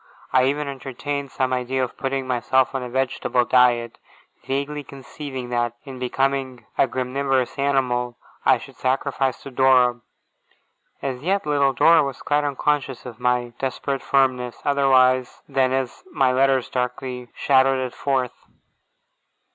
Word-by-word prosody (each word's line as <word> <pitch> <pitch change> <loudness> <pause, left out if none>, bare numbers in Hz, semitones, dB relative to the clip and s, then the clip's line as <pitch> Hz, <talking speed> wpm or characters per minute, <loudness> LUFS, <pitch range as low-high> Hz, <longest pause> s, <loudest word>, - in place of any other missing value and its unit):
I 130 0 +5
even 145 +2 0
entertained 140 +1 -5
some 130 -1 -1
idea 130 +1 -1
of 125 - -4
putting 135 0 -2
myself 130 +1 +1
on 135 - -2
a 125 - -5
vegetable 130 -1 0
diet, 120 -2 +3 0.5
vaguely 140 +2 -2
conceiving 135 -1 -8
that, 120 -1 -1
in 135 -3 -9
becoming 135 0 -1
a - - +3
graminivorous 130 +1 -1
animal, 125 -3 0 0.3
I - - +5
should - - -13
sacrifice 135 0 -1
to 140 - -8
Dora. 125 -2 +4 1.0
As 130 -2 -3
yet, 190 +4 0
little 140 -2 +2
Dora 165 +5 +6
was 140 -2 -4
quite 145 0 +1
unconscious 140 -2 -1
of 120 -3 -9
my 125 -1 +1
desperate 135 0 -2
firmness, 130 -3 +1
otherwise 130 -3 +3
than 135 -2 +1
as 130 -2 -2
my 135 -4 +2
letters 130 0 +2
darkly 125 0 -4
shadowed 135 -1 +3
it 130 -1 -3
forth. 130 -3 -2
130 Hz, 140 wpm, -23 LUFS, 125-135 Hz, 1.0 s, Dora